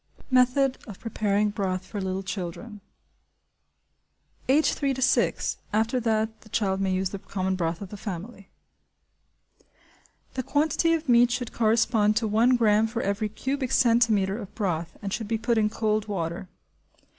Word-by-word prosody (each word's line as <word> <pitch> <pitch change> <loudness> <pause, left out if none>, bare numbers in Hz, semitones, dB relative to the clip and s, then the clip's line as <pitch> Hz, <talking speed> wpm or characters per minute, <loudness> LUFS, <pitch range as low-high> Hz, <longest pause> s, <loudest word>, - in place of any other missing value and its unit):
Method 255 +1 +3
of 205 -4 -9
Preparing 210 -2 0
Broth 190 -3 -2
for 205 0 -5
Little 190 0 -3
Children. 195 +3 -6 1.7
(Age 295 +4 +4
three 275 -2 -1
to - - -6
six; - - +1
after 225 +4 +1
that 220 -1 -1
the 215 - -17
child 195 -3 0
may 190 -1 +1
use 185 0 -1
the 200 - -5
common 190 -1 -2
broth 170 -1 -2
of 195 - -9
the 205 - -8
family.) 200 +1 -7 1.8
The 260 - -2
quantity 310 +5 +1
of 320 -1 -5
meat 240 -1 +5
should 245 -1 -3
correspond 220 -1 +2
to 225 0 +1
1 230 +4 +4
gramme 220 -1 +3
for 230 +1 -3
every 200 +2 -1
cubic 265 +4 -3
centimetre 230 -5 +3
of 205 -3 -9
broth 170 -6 -2
and 200 -1 -3
should 225 -3 -3
be 225 +1 0
put 230 0 +1
in 210 -1 +2
cold 215 -1 -1
water. 175 -2 -4
215 Hz, 155 wpm, -26 LUFS, 195-235 Hz, 1.8 s, meat